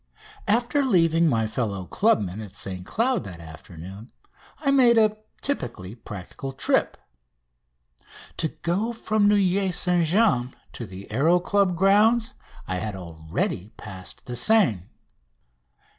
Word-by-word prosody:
After 240 +7 +2
leaving 165 - +3
my 115 -6 +1
fellow 105 -4 -3
clubmen 105 - 0
at 105 -4 -9
St 95 -2 -4
Cloud 245 - 0
that 90 -4 -9
afternoon 85 +6 -11 0.5
I 275 -3 +2
made 250 -4 +5
a 215 -1 +3 0.2
typically 120 - -3
practical 115 +4 -8
trip. 130 - +1 1.4
To 160 - +1
go 195 +9 -2
from 215 -2 +1
Neuilly 195 -2 +2
St 180 -2 +2
James 155 - +2 0.2
to 120 - -7
the 95 +1 -10
Aéro 155 +10 +3
Club's 195 0 +1
grounds 215 +6 +3 0.3
I 90 - -2
had 105 +1 -4
already 85 +3 -4
passed 95 -2 -7
the 125 - -5
Seine. 125 - +3
160 Hz, 125 wpm, -24 LUFS, -, 1.4 s, made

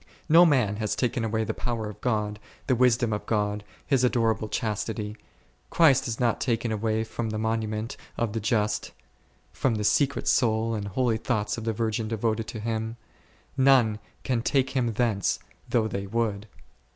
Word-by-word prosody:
No 170 +2 +7
man 120 -9 +2
has 105 -2 -1
taken 125 -1 0
away 110 0 0
the - - -2
power 115 -3 -3
of 105 - -9
God, 105 -3 -1 0.3
the 130 - +2
wisdom 120 -2 +3
of 105 - -4
God, 105 -1 0 0.2
His 135 -3 +2
adorable 115 -3 +1
chastity: 105 -1 -3 0.5
Christ 140 -7 +4
is 115 -1 -3
not 120 -3 +1
taken 115 -2 0
away 110 +1 0
from 110 +1 -4
the 110 - -3
monu 110 0 0
ment 110 +1 -4 0.2
of 115 -3 -1
the 115 - -1
just, 110 -1 0 0.6
from 125 -4 0
the 105 - -2
secret 140 +6 +2
soul 115 -2 +2
and 105 -2 -3
holy 115 +3 +1
thoughts 110 -2 -1
of 115 - -6
the 115 - 0
virgin 110 0 -1
devoted 110 0 -1
to 110 - -6
Him; 110 +1 -3 0.6
none 130 -6 +4 0.2
can 125 -3 0
take 135 +1 +1
Him 120 -4 0
thence, 110 -4 +1 0.3
though 115 -2 +2
they 100 -1 -4
would. 105 -1 -1
115 Hz, 175 wpm, -26 LUFS, 110-120 Hz, 0.6 s, No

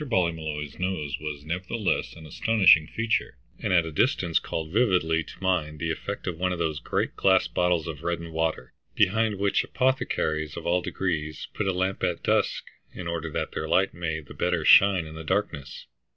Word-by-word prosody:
Ballymolloy's 80 - -2
nose 80 -7 -2
was 75 -1 -6
nevertheless 90 +5 -2
an 80 - -12
astonishing 80 -2 +4
feature, 110 - -1 0.2
and - - -2
at 85 -2 +4
a 80 - -5
distance 90 - +2
called 80 -1 -5
vividly 90 -7 +2
to - - -13
mind 80 -5 0
the 80 +1 -2
effect 100 +5 -5
of 85 -3 -4
one 90 0 +1
of 90 - -2
those 80 -3 -1
great - - -2
glass 95 -1 +3
bottles 90 -2 +1
of 75 -3 -6
reddened 85 -1 -3
water, 80 -5 -2 0.2
behind 110 +1 +2
which 100 0 +1
apothecaries 80 - -1
of - - -7
all 90 +1 +2
degrees 80 -5 -3
put 105 - -2
a - - +3
lamp 95 +1 -1
at - - -1
dusk - - +1 0.3
in 90 - -8
order 85 -1 -3
that - - -3
their - - -4
light 95 +1 +3
may 80 -3 -3
the 70 - -12
better 90 -3 0
shine 95 -4 +6
in 80 - -9
the 80 0 -8
darkness. 75 -6 -3
85 Hz, 185 wpm, -26 LUFS, 80-95 Hz, 0.3 s, shine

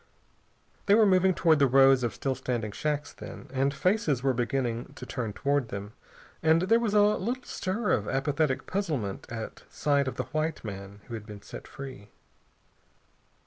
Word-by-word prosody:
They 200 - +7
were 220 -1 +6
moving 185 -1 +4
toward 160 -3 +4
the 140 - +5
rows 135 0 +6
of 120 -2 -1
still 135 - -1
standing 120 -5 -3
shacks, 150 +5 -2
then, - - -10
and 135 +1 +2
faces 150 - +1
were 135 -1 +3
beginning 120 +1 -2
to - - -8
turn 120 -5 -3
toward 140 +2 0
them, 100 +2 -6 0.5
and 160 +2 +4
there 225 +5 +4
was 220 -3 0
a 205 - +7
little 225 +5 0
stir 205 +4 -2
of 105 -4 +1
apathetic 140 +1 0
puzzlement 150 - -3
at 115 -2 -6
sight 140 -2 +1
of 130 - -3
the 130 - -2
white 155 +1 -1
man 100 0 -7
who 120 - -9
had 110 -2 -6
been 105 -2 -10
set - - -9
free. 130 -7 -9
135 Hz, 175 wpm, -28 LUFS, 120-165 Hz, 0.5 s, They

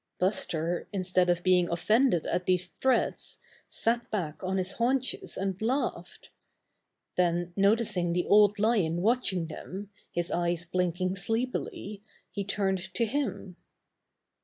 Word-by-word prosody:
Buster, 175 -3 -1
instead 185 -2 +1
of 175 0 +1
being 180 -1 +4
offended 215 - +2
at 180 - -1
these 180 -1 +2
threats, 265 -1 0 0.3
sat 235 +1 0
back 175 -6 -3
on 190 +1 -1
his 185 0 0
haunches 255 +3 -1
and 190 0 -2
laughed. 255 +6 -2 0.9
Then 175 -1 +1
noticing 200 -3 +2
the 175 +1 0
Old 205 0 +5
Lion 200 -6 +1
watching 210 -6 +1
them, 190 +5 -8 0.2
his 175 0 -2
eyes 175 0 0
blinking 185 +1 -1
sleepily, 225 -2 -3 0.3
he 200 - -3
turned 195 -1 0 0.2
to 230 - +2
him. 230 -7 -3
190 Hz, 125 wpm, -29 LUFS, 175-215 Hz, 0.9 s, Old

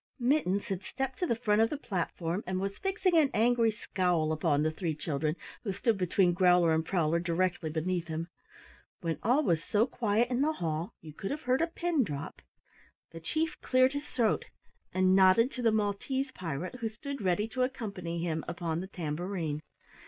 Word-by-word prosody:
Mittens 240 -7 +1
had 195 -2 -3
stepped 265 +3 -4
to 360 - 0
the 235 - +1
front 215 -2 +2
of 225 - +4
the 300 - -3
platform 180 - -3
and 185 0 -1
was 195 +1 -3
fixing 385 -2 +1
an 310 -4 +5
angry 230 +1 +4
scowl 180 -6 0
upon 155 -2 +1
the 155 - +1
three 160 -1 -2
children 155 0 -1 0.3
who 200 - -1
stood 225 +4 +1
between 180 0 +3
Growler 180 -2 +4
and 160 0 +2
Prowler 165 -2 +1
directly 175 -1 0
beneath 170 +2 -1
him. 160 +1 -3 0.7
When 165 -2 -2
all 255 +8 +3
was 165 - +1
so 215 +2 +2
quiet 235 -1 0
in 250 +1 +1
the 310 +2 +2
hall 165 - -3
you 155 -2 -10
could 195 - -5
have 300 +2 -4
heard 255 +3 +2
a 330 - +2
pin 335 -3 0
drop, 145 -8 -6 0.7
the 165 - -8
Chief 315 - -2
cleared 255 +1 +3
his 285 +1 -3
throat 230 -4 +1 0.5
and 185 0 +3
nodded 195 +7 +5
to 250 - -5
the 230 -2 +4
Maltese 220 +6 -1
pirate 180 - -5
who 225 -2 -1
stood 275 +4 -6
ready 195 +3 +1
to 255 +3 -3
accompany 200 -10 -3
him 160 -2 -1
upon 170 -2 -2
the 185 - -5
tambourine. 165 -2 -3
190 Hz, 190 wpm, -30 LUFS, 170-245 Hz, 0.7 s, an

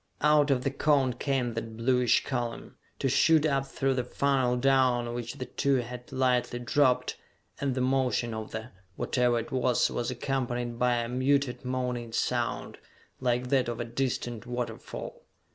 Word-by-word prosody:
Out 150 -1 +4
of 130 -2 +2
the 135 - 0
cone 140 -3 +2
came 125 -1 -1
that 115 0 -5
bluish 125 0 +3
column, 120 -3 -4 0.2
to - - 0
shoot 155 +4 +4
up 135 -2 +1
through 135 0 0
the 125 -1 -1
funnel 130 -1 +1
down 125 -2 +2
which 120 0 -5
the 130 - -5
two 140 +1 +1
had 125 0 -4
lightly 125 -2 +1
dropped... 125 0 +2 0.4
and 135 -2 -1
the 130 - 0
motion 130 -2 +1
of 110 0 -5
the 110 +3 -6 0.2
whatever 125 -2 +1
it 115 - -4
was 125 -2 +2
was 120 +1 -2
accompanied 120 -2 -2
by 125 -1 +3
a 120 -1 -1
muted 130 0 +1
moaning 125 -2 -2
sound, 125 +1 -1 0.4
like 125 0 0
that 130 -3 +2
of 120 0 -4
a 120 - -2
distant 120 -1 -3
waterfall. 125 0 -5
125 Hz, 160 wpm, -28 LUFS, 120-135 Hz, 0.4 s, Out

